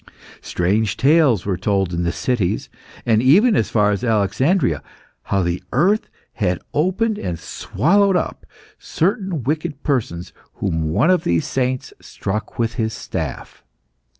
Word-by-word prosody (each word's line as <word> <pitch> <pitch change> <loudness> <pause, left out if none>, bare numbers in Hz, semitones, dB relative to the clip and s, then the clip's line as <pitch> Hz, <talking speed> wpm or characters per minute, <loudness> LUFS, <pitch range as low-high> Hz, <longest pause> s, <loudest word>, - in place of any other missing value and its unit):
Strange 100 +3 0
tales 140 - +4
were 100 -2 0
told 95 -3 0
in 85 - -1
the 85 -1 0
cities, 115 -6 -1 0.4
and 110 -2 +3
even 195 - +5
as 110 - +1
far 105 -2 +3
as 100 +3 -2
Alexandria, 110 - +1 0.4
how 100 -2 +1
the 85 +1 -1
earth 190 - +2 0.2
had 90 -6 0
opened 205 +7 +1
and 85 -2 -3
swallowed 195 - +1
up 180 - -2 0.4
certain 190 - -1
wicked 150 +1 -2
persons 105 - -2 0.2
whom 80 -5 -1
one 150 - +3
of 185 - +2
these 85 -1 +1
saints 130 -1 -2
struck 105 +3 -5
with 115 0 0
his 110 +1 -1
staff. - - -6
115 Hz, 140 wpm, -20 LUFS, 95-160 Hz, 0.4 s, even